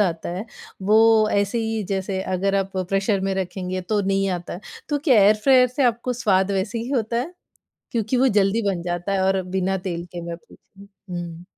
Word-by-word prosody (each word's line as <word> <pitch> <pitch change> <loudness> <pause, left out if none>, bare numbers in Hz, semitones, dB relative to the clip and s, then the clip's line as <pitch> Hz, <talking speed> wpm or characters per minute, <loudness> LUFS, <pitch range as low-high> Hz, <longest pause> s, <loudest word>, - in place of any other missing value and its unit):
आता 170 -5 0
है 195 - -4 0.5
वो 215 - +7 0.3
ऐसे 200 +3 +1
ही 225 -1 -1
जैसे 190 -1 -2 0.2
अगर 195 +2 0
आप 195 -1 -1
प्रेशर 195 +2 0
में 195 0 -1
रखेंगे 185 0 -3
तो 205 +3 -1
नहीं 195 0 +1
आता 175 - -9
है। 180 - -7 0.3
तो 295 - 0
क्या 265 -7 +4
एयर 210 +2 +6
फ्रायर 260 -2 +6
से 255 +3 -2
आपको 240 +1 +1
स्वाद 200 -5 +1
वैसे 205 +4 -1
ही 235 +3 -5
होता 235 -4 0
है? 260 +9 -2 0.6
क्योंकि 230 +1 0
वो 260 +1 +4
जल्दी 200 +3 +2
बन 180 -3 -1
जाता 175 +2 -3
है 195 - +1
और 190 0 +2
बिना 190 +1 +1
तेल 175 -2 -4
के 175 - -5
मैं 170 0 -4
पूछूँ? 195 +3 -19 0.2
हुँ। 175 -1 -6
195 Hz, 200 wpm, -22 LUFS, 185-225 Hz, 0.6 s, वो